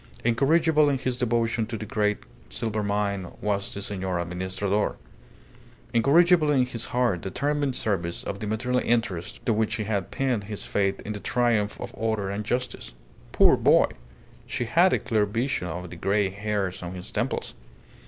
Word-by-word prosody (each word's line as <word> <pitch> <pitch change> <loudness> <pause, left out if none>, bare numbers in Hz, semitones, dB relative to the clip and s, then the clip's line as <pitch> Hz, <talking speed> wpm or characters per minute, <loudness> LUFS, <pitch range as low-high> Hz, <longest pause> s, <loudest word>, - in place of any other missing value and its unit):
Incorrigible 150 +5 +3
in 140 - +1
his 130 -1 -2
devotion 115 -2 0
to 115 -1 -4
the 110 - -6
great 105 -1 +1 0.3
silver 110 - -2
mine 100 -3 -1
was 100 -1 -1
the 100 - -5
Senor 95 -3 -2
Administrador! 95 +4 -1 1.0
Incorrigible 155 +6 +5
in 135 -4 +4
his 120 -2 -5
hard, 120 -9 0
determined 140 +6 -1
service 90 -7 -1
of 100 - -5
the 105 - -4
material 125 +4 0
interests 110 -7 -1
to 115 - +3
which 110 0 0
he 110 - -2
had 100 -3 -2
pinned 125 -7 -1
his 105 0 -4
faith 100 -1 0
in 105 - -5
the 105 - -5
triumph 115 -3 +1
of - - -6
order 110 -3 -1
and 105 +1 -4
justice. 120 - -3 0.4
Poor - - +6
boy! - - +4 0.6
She 120 - -2
had 170 +10 +4
a - - +3
clear 105 -2 +1
vision 115 -2 -1
of 90 +1 -6
the - - -7
grey 100 +2 +1
hairs 100 -2 -2
on 90 +1 -6
his 90 - -8
temples. - - -2
105 Hz, 170 wpm, -26 LUFS, 100-125 Hz, 1.0 s, Poor